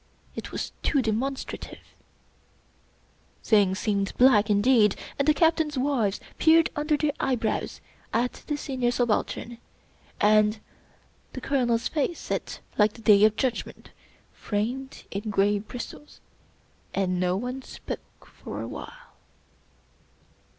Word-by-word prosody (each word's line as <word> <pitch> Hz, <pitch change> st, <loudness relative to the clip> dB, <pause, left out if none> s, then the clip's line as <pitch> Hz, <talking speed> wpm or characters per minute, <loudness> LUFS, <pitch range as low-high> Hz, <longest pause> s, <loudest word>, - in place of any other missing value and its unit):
It -, -, -6 dB
was -, -, -4 dB
too 275 Hz, -4 st, +2 dB
demonstrative. 245 Hz, +5 st, -4 dB, 1.5 s
Things 200 Hz, -4 st, +3 dB
seemed 200 Hz, -2 st, -1 dB
black 235 Hz, -5 st, +5 dB
indeed, 210 Hz, 0 st, +4 dB, 0.2 s
and 280 Hz, -, +1 dB
the 305 Hz, -, +6 dB
Captains' 320 Hz, -3 st, +2 dB
wives 255 Hz, -7 st, +1 dB, 0.2 s
peered 325 Hz, 0 st, +5 dB
under 300 Hz, +1 st, +1 dB
their 300 Hz, 0 st, +1 dB
eyebrows 245 Hz, -4 st, -1 dB, 0.3 s
at 240 Hz, +2 st, -1 dB
the 295 Hz, -, -1 dB
Senior 260 Hz, -4 st, -1 dB
Subaltern, 240 Hz, 0 st, -1 dB, 0.6 s
and 215 Hz, +1 st, +4 dB, 0.7 s
the -, -, -5 dB
Colonel's 245 Hz, -4 st, +1 dB
face 320 Hz, +2 st, -1 dB
set -, -, -4 dB, 0.2 s
like 210 Hz, 0 st, +4 dB
the 230 Hz, -, -14 dB
Day 210 Hz, -1 st, +6 dB
of 215 Hz, 0 st, +3 dB
Judgment 255 Hz, 0 st, -3 dB, 0.4 s
framed 245 Hz, +6 st, -3 dB
in 205 Hz, +2 st, -4 dB
gray 205 Hz, 0 st, +2 dB
bristles, 245 Hz, +7 st, -9 dB, 0.8 s
and 185 Hz, -2 st, 0 dB
no 180 Hz, 0 st, +1 dB
one 250 Hz, +5 st, -4 dB
spoke -, -, -9 dB
for -, -, -9 dB
a -, -, -4 dB
while. -, -, -10 dB
240 Hz, 120 wpm, -26 LUFS, 210-275 Hz, 1.5 s, the